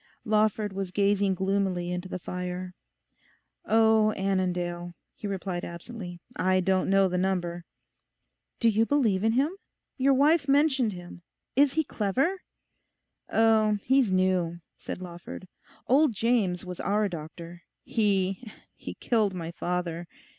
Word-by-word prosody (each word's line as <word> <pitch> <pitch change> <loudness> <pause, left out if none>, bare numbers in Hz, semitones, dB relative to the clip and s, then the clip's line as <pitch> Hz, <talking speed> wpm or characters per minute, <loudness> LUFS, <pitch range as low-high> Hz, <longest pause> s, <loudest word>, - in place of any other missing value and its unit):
Lawford 215 -1 +1
was 195 -1 -3
gazing 200 0 +2
gloomily 190 -2 0
into 180 +1 -4
the - - -3
fire. 180 0 -5 0.9
'Oh, 220 -1 +4
Annandale,' 180 -2 -2 0.2
he 210 - -7
replied 190 -2 -3
absently. 175 0 -8 0.2
'I 185 0 +2
don't 190 0 +1
know 195 0 +4
the 180 0 -1
number.' 175 -2 -1 0.9
'Do 230 - +4
you 220 +1 +3
believe 225 -10 +2
in 225 0 +3
him? 285 +9 +1 0.4
Your 270 0 +3
wife 290 +2 +3
mentioned 275 -5 +3
him. 175 -1 -10 0.3
Is 280 0 +4
he 315 - +2
clever?' 270 - -1 0.9
'Oh, 220 -1 +3
he's 260 -5 +3
new,' 185 -2 +1 0.2
said 185 - -6
Lawford; 175 +1 -9 0.4
'old 280 0 +4
James 200 -6 +1
was 180 -1 -7
our 210 +1 +1
doctor. 170 0 -8 0.2
He—he 205 0 -2
killed 215 -5 +1
my 165 -2 -5
father. 175 -1 -3
195 Hz, 125 wpm, -27 LUFS, 180-225 Hz, 0.9 s, Oh